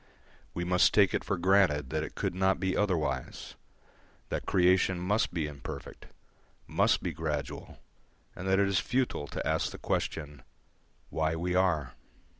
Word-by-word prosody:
We 85 Hz, -, -2 dB
must 90 Hz, +1 st, +3 dB
take 100 Hz, -3 st, +5 dB
it -, -, 0 dB
for 100 Hz, -, -1 dB
granted 85 Hz, -7 st, +3 dB
that 80 Hz, 0 st, 0 dB
it 80 Hz, -, -6 dB
could -, -, -2 dB
not 95 Hz, 0 st, +1 dB
be 95 Hz, 0 st, 0 dB
otherwise; 80 Hz, -10 st, -1 dB, 0.8 s
that -, -, -3 dB
creation 90 Hz, 0 st, +3 dB
must 100 Hz, +5 st, +1 dB
be 85 Hz, -3 st, -1 dB
imperfect, 70 Hz, -3 st, -8 dB, 0.6 s
must -, -, +2 dB
be -, -, -2 dB
gradual, 75 Hz, -3 st, -4 dB, 0.6 s
and 90 Hz, -, -6 dB
that 95 Hz, 0 st, +3 dB
it 100 Hz, 0 st, +3 dB
is 95 Hz, -2 st, +2 dB
futile 125 Hz, -, -1 dB
to -, -, -4 dB
ask -, -, +1 dB
the -, -, -9 dB
question, 75 Hz, -3 st, -3 dB, 0.7 s
Why 80 Hz, 0 st, 0 dB
we 90 Hz, +2 st, -2 dB
are? 85 Hz, -8 st, +1 dB
90 Hz, 155 wpm, -30 LUFS, 75-95 Hz, 0.8 s, take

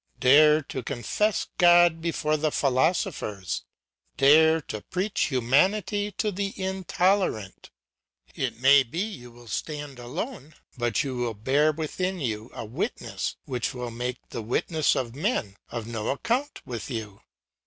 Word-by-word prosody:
Dare 150 Hz, +4 st, +6 dB
to 135 Hz, -, -5 dB
confess 140 Hz, -, -1 dB
God 175 Hz, -2 st, +6 dB
before 160 Hz, -2 st, 0 dB
the 155 Hz, 0 st, 0 dB
philosophers; 110 Hz, -, 0 dB, 0.5 s
dare 160 Hz, +4 st, +6 dB
to 110 Hz, -7 st, -6 dB
preach 190 Hz, -, -1 dB
humanity 190 Hz, -, +1 dB
to 210 Hz, +2 st, -1 dB
the 195 Hz, +1 st, -4 dB
intolerant. 190 Hz, -, 0 dB, 0.6 s
It -, -, -3 dB
may 135 Hz, +2 st, +7 dB
be 135 Hz, +5 st, -7 dB
you 180 Hz, -, -4 dB
will 120 Hz, 0 st, -16 dB
stand 145 Hz, +1 st, -5 dB
alone, 150 Hz, -, -6 dB, 0.2 s
but 120 Hz, -1 st, 0 dB
you 130 Hz, -3 st, -4 dB
will 120 Hz, -2 st, -2 dB
bear 140 Hz, +8 st, +2 dB
within 180 Hz, +4 st, -3 dB
you 110 Hz, -4 st, -3 dB
a -, -, -5 dB
witness 110 Hz, -, -3 dB
which 125 Hz, -1 st, -3 dB
will 125 Hz, -1 st, -4 dB
make 125 Hz, +2 st, -3 dB
the 115 Hz, -, -5 dB
witness 150 Hz, +7 st, +1 dB
of 120 Hz, -3 st, -2 dB
men 140 Hz, -, -1 dB
of 120 Hz, -2 st, -5 dB
no 110 Hz, -2 st, -4 dB
account 245 Hz, -, -1 dB
with 120 Hz, 0 st, -6 dB
you. 110 Hz, -5 st, -6 dB
140 Hz, 140 wpm, -26 LUFS, 120-175 Hz, 0.6 s, may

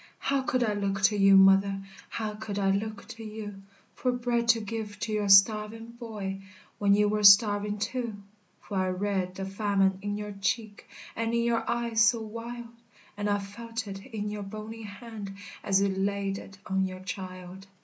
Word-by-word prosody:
How 275 Hz, -1 st, 0 dB
could 255 Hz, -1 st, 0 dB
I 215 Hz, -3 st, +1 dB
look 200 Hz, -1 st, -1 dB
to 210 Hz, +1 st, +5 dB
you, 195 Hz, -1 st, +6 dB
mother, 195 Hz, +1 st, +5 dB, 0.3 s
How 215 Hz, -2 st, -3 dB
could 210 Hz, -1 st, -6 dB
I 195 Hz, -1 st, +2 dB
look 215 Hz, +1 st, -3 dB
to 230 Hz, -2 st, -8 dB
you 210 Hz, -2 st, -7 dB, 0.3 s
For 250 Hz, -, 0 dB
bread 240 Hz, -1 st, 0 dB
to 230 Hz, -1 st, +5 dB
give 210 Hz, -1 st, -5 dB
to 215 Hz, -, -2 dB
your 210 Hz, -1 st, 0 dB
starving 215 Hz, +3 st, +5 dB
boy, 210 Hz, -5 st, -6 dB, 0.4 s
When 200 Hz, -1 st, +4 dB
you 210 Hz, 0 st, +3 dB
were 210 Hz, 0 st, 0 dB
starving 205 Hz, 0 st, +6 dB
too? 230 Hz, +2 st, -3 dB, 0.5 s
For 200 Hz, -, -5 dB
I 185 Hz, 0 st, +1 dB
read 185 Hz, -1 st, -1 dB
the 195 Hz, -, -4 dB
famine 195 Hz, -1 st, +1 dB
in 205 Hz, +1 st, -3 dB
your 210 Hz, 0 st, -5 dB
cheek, 205 Hz, +2 st, -3 dB, 0.3 s
And 230 Hz, +1 st, -1 dB
in 235 Hz, -, +2 dB
your 235 Hz, -1 st, 0 dB
eyes 235 Hz, -1 st, +1 dB
so 215 Hz, +2 st, +5 dB
wild, 230 Hz, +2 st, -7 dB, 0.5 s
And 205 Hz, 0 st, -2 dB
I 205 Hz, -, +2 dB
felt 225 Hz, +3 st, -6 dB
it 195 Hz, 0 st, -7 dB
in 210 Hz, -5 st, -5 dB
your 210 Hz, 0 st, -5 dB
bony 215 Hz, +3 st, -7 dB
hand, 210 Hz, -1 st, -8 dB, 0.3 s
As 195 Hz, -1 st, +3 dB
you 200 Hz, -, +3 dB
laid 195 Hz, 0 st, -1 dB
it 195 Hz, -, -12 dB
on 190 Hz, 0 st, 0 dB
your 185 Hz, 0 st, -8 dB
child. 185 Hz, 0 st, -7 dB
205 Hz, 185 wpm, -28 LUFS, 195-225 Hz, 0.5 s, you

